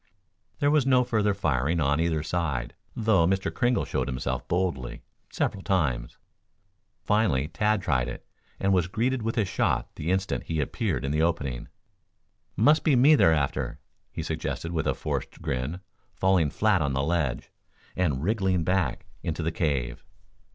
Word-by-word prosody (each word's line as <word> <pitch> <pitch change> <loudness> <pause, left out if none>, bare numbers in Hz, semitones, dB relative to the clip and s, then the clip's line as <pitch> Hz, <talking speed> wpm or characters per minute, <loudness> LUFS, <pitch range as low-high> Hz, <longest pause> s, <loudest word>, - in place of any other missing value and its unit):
There 145 0 +2
was 150 -3 +3
no 130 -1 +5
further 105 -4 +1
firing 80 -3 0
on 70 0 +2
either 80 -2 0
side, 80 -9 -2 0.2
though 105 -7 +3
Mr. 95 +1 0
Kringle 120 -1 +1
showed - - -2
himself 65 -1 -3
boldly 85 -8 -2 0.3
several 100 - -2
times. 70 - -1 0.9
Finally 90 -10 +1
Tad 105 -2 +1
tried 65 -7 +1
it, 65 - -7 0.3
and 95 0 +2
was 90 -2 +2
greeted 120 +6 0
with 115 +2 -2
a 110 - +3
shot 95 - -1
the 75 - -3
instant 95 +1 -1
he 80 -1 -2
appeared 70 - -1
in 70 - -1
the 75 +1 +1
opening. 70 -7 -1 0.9
"Must 150 +9 +4
be 150 - +4
me 135 +5 +6
they're 110 - +5
after," 70 -4 -1 0.3
he - - -5
suggested, 85 - -3
with 80 -3 -1
a - - +1
forced - - -4
grin, 75 +3 -3 0.3
falling 95 -5 +3
flat 105 +2 +2
on 70 -2 0
the 70 0 0
ledge, 75 -6 -1 0.4
and 75 -7 0
wriggling 95 -3 +1
back 90 -6 0 0.2
into 80 0 -3
the 80 - 0
cave. 70 -7 -1
85 Hz, 160 wpm, -27 LUFS, 70-105 Hz, 0.9 s, me